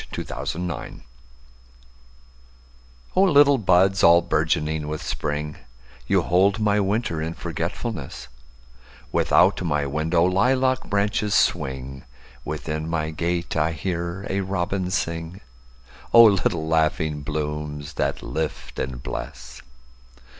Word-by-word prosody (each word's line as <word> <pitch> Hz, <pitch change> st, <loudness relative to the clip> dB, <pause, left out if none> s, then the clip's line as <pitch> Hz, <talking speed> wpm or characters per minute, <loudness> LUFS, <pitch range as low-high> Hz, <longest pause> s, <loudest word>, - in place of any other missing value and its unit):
A -, -, -4 dB
Song -, -, -16 dB
in -, -, -5 dB, 0.2 s
Spring 85 Hz, -, -7 dB, 2.1 s
O 185 Hz, -, +4 dB
LITTLE 145 Hz, -7 st, +5 dB
buds 95 Hz, 0 st, +3 dB
all 85 Hz, 0 st, +7 dB
bourgeoning 80 Hz, -2 st, 0 dB
with 75 Hz, 0 st, -4 dB
Spring, 75 Hz, +1 st, -3 dB, 0.5 s
You -, -, +2 dB
hold 95 Hz, +5 st, +3 dB
my 105 Hz, -1 st, +2 dB
winter 100 Hz, -4 st, -1 dB
in 80 Hz, +1 st, -4 dB
forgetfulness; 85 Hz, -, -5 dB, 0.8 s
Without -, -, +3 dB
my 75 Hz, -5 st, 0 dB
window 80 Hz, +4 st, +1 dB
lilac 130 Hz, +8 st, +2 dB
branches 105 Hz, +1 st, 0 dB
swing, 65 Hz, 0 st, 0 dB, 0.4 s
Within 80 Hz, 0 st, -4 dB
my 80 Hz, -1 st, -1 dB
gate 85 Hz, +2 st, -2 dB
I 80 Hz, +1 st, +1 dB
hear 85 Hz, +2 st, -4 dB
a 100 Hz, +1 st, -1 dB
robin 95 Hz, -1 st, -2 dB
sing—O 65 Hz, -, 0 dB
little 100 Hz, -5 st, +3 dB
laughing 80 Hz, -1 st, +1 dB
blooms 75 Hz, -1 st, -4 dB
that -, -, -2 dB
lift 80 Hz, -2 st, -4 dB
and 65 Hz, -1 st, -4 dB
bless! 65 Hz, 0 st, -7 dB
85 Hz, 110 wpm, -23 LUFS, 75-95 Hz, 2.1 s, all